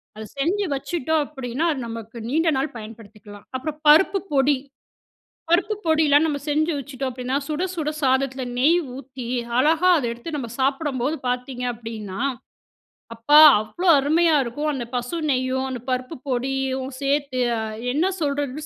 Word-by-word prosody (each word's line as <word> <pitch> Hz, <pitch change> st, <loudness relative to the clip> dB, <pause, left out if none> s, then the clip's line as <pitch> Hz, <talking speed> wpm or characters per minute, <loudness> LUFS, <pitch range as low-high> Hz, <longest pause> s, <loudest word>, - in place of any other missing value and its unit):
அத 220 Hz, -, -7 dB, 0.2 s
செஞ்சு 380 Hz, +8 st, +1 dB
வச்சுட்டோம் 315 Hz, +1 st, -1 dB
அப்டின்னா, 265 Hz, +1 st, -4 dB
அது 270 Hz, -, -6 dB
நமக்கு 225 Hz, 0 st, -8 dB
நீண்ட 320 Hz, +4 st, +2 dB
நாள் 275 Hz, +1 st, -2 dB
பயன்படுத்திக்கலாம். 215 Hz, -2 st, -12 dB
அப்புறம் 295 Hz, +4 st, -4 dB
பருப்பு 385 Hz, +6 st, +6 dB
பொடி, 275 Hz, 0 st, +3 dB, 0.9 s
பருப்பு 395 Hz, +5 st, +2 dB
பொடிலாம் 315 Hz, -1 st, +4 dB
நம்ம 295 Hz, -2 st, -1 dB
செஞ்சு 310 Hz, +3 st, +1 dB
வச்சுட்டோம் 270 Hz, -1 st, -4 dB
அப்டின்னா 255 Hz, +2 st, -3 dB
சுட 305 Hz, +3 st, -2 dB
சுட 305 Hz, -2 st, -1 dB
சாதத்துல 265 Hz, 0 st, +1 dB, 0.2 s
நெய் 310 Hz, +7 st, +4 dB, 0.2 s
ஊத்தி 260 Hz, -2 st, -9 dB, 0.3 s
அழகா 320 Hz, +6 st, +3 dB
அத 275 Hz, -, -3 dB
எடுத்து 295 Hz, +7 st, -6 dB
நம்ப 240 Hz, -4 st, -5 dB
சாப்படும்போது 275 Hz, 0 st, 0 dB
பார்த்தீங்க 250 Hz, 0 st, -3 dB
அப்டின்னா, 215 Hz, -4 st, -7 dB, 0.9 s
அப்பா! 260 Hz, +7 st, +5 dB, 0.2 s
அவ்ளோ 215 Hz, -, -5 dB
அருமையா 315 Hz, +3 st, +3 dB
இருக்கும். 290 Hz, +6 st, -3 dB
அந்த 255 Hz, -4 st, -4 dB
பசு 245 Hz, +6 st, -2 dB
நெய்யும், 260 Hz, 0 st, 0 dB
அந்த 250 Hz, -2 st, -5 dB
பருப்பு 255 Hz, +4 st, -2 dB
பொடியும் 265 Hz, +1 st, -2 dB
சேர்த்து 275 Hz, -2 st, 0 dB, 0.2 s
அ -, -, -2 dB, 0.3 s
என்ன 335 Hz, +8 st, +1 dB
சொல்றதுன்னு 285 Hz, 0 st, -2 dB
270 Hz, 140 wpm, -23 LUFS, 250-305 Hz, 0.9 s, பருப்பு